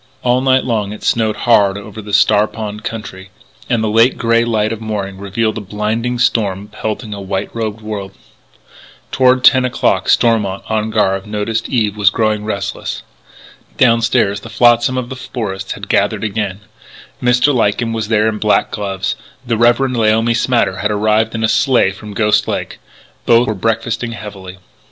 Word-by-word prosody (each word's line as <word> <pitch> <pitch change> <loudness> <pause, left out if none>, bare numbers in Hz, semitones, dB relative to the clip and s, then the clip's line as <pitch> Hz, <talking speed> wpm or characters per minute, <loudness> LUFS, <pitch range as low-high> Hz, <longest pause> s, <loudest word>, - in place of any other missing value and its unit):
All 125 +1 +2
night 130 0 +3
long 110 -5 -1
it 105 - -11
snowed 110 -2 +1
hard 100 -5 +4
over 105 +1 -9
the 105 0 -9
Star 105 +1 +4
Pond 105 -1 -7
country, 95 -4 -7 0.4
and 115 -3 +1
the - - 0
late 115 +4 +3
grey 115 0 +2
light 110 -2 0
of 115 - -8
morning 100 -3 -4
revealed 110 +3 -2
a - - -7
blinding 110 +5 -2
storm 105 -4 0
pelting 110 +1 -5
a 100 - -7
white 95 0 -3
robed 110 -1 -4
world. 105 -3 -5 1.0
Toward 130 0 +3
ten 130 0 +6
o'clock, 125 - 0
Stormont, 105 -5 +2
on 110 0 -1
guard, 95 -2 0
noticed 110 +2 -2
that - - -8
Eve 110 -4 +1
was 105 -2 +4
growing 110 0 0
restless. 100 -2 -4 0.7
Downstairs 115 -4 +2
the 115 - -11
flotsam 120 +2 +3
of 125 -1 -3
the 130 - -6
forest 115 -7 -5
had - - -9
gathered - - +1
again: 105 -2 -3 0.6
Mr. 125 +3 +3
Lyken 115 -1 0
was 110 -2 -3
there 110 -1 +2
in 110 -1 -2
black 105 -1 +1
gloves; 95 -2 -3 0.3
the 115 -1 0
Reverend 120 +3 +2
Laomi 115 +1 +2
Smatter 115 -5 +1
had 105 +2 -1
arrived 110 +2 +1
in 110 - -2
a - - +3
sleigh 110 -2 +2
from 100 +1 -10
Ghost 105 0 +2
Lake. - - -4 0.5
Both 120 +1 +4
were 110 - 0
breakfasting 115 +3 -2
heavily. 95 -4 -9
110 Hz, 170 wpm, -16 LUFS, 105-115 Hz, 1.0 s, ten